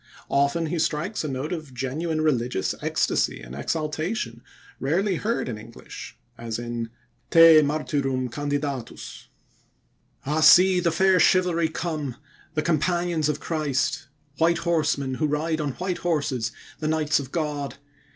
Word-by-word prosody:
Often 140 +4 +2
he 165 +2 -2
strikes 165 +7 -1
a - - -2
note 135 +4 -3
of 155 -6 -7
genuine 155 +6 -2
religious 125 -9 0
ecstasy - - 0
and - - -10
exaltation 155 - -3 0.4
rarely 180 +7 +1
heard 230 +6 -1
in 110 -4 -4
English, - - -11 0.2
as 115 -1 -4
in 120 -1 -4 0.4
"Te 165 -1 +8
Martyrum 140 -3 -1
Candidatus": 145 -1 -4 1.0
Ah, 150 +3 0
see 180 +4 +7
the 170 -1 +2
fair 190 +2 +3
chivalry 175 -4 +3
come, 155 -5 -3 0.4
the 155 - +1
companions 170 0 +1
of 150 - -1
Christ! 145 -5 -1 0.3
White 170 +1 +4
Horsemen, 150 -5 +1
who 155 +4 0
ride 155 +2 -1
on 145 -3 -2
white 180 +4 -3
horses, 140 -8 -1 0.3
the 155 - -2
Knights 155 -1 +2
of 135 -2 -7
God! 150 -4 -2
155 Hz, 135 wpm, -25 LUFS, 135-165 Hz, 1.0 s, Te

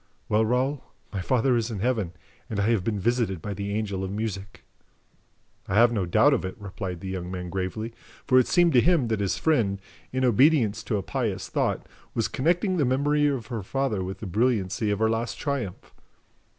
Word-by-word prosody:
Well, 110 +1 +3
Raoul, 130 +5 0 0.3
my 100 - -2
father 125 +4 +2
is 115 -1 0
in 110 - -4
Heaven, 110 -5 -1 0.4
and 105 -4 -2
I 105 +3 +2
have 110 -6 +1
been 105 0 -1
visited 115 -3 0
by 100 +5 -5
the 100 +1 -4
Angel 100 -2 -2
of 95 - -3
Music." 100 -1 -5 1.0
"I - - -1
have 120 +3 +6
no 100 -6 -1
doubt 140 +11 +5
of 135 - 0
it," 95 - -4
replied 95 -3 -6
the 95 - -6
young 90 -2 -4
man 90 -1 -5
gravely, 95 +5 -3 0.3
for 130 -1 +5
it 125 - +2
seemed 175 -3 +4
to 125 - +6
him 160 -8 +3
that 110 -2 0
his 100 -2 0
friend, 110 -11 +1 0.3
in 130 0 +1
obedience 120 -3 +4
to 105 - 0
a 100 - -3
pious - - -2
thought, - - -1 0.3
was - - +1
connecting 175 +6 +1
the 150 - +3
memory 145 +3 +2
of 135 -6 -1
her 115 - -2
father 110 -1 -1
with 95 +1 -6
the - - -4
brilliancy 105 -1 0
of 105 - +1
her 110 +2 +2
last 115 +1 -1
triumph. 135 -10 -4
110 Hz, 205 wpm, -26 LUFS, 100-130 Hz, 1.0 s, have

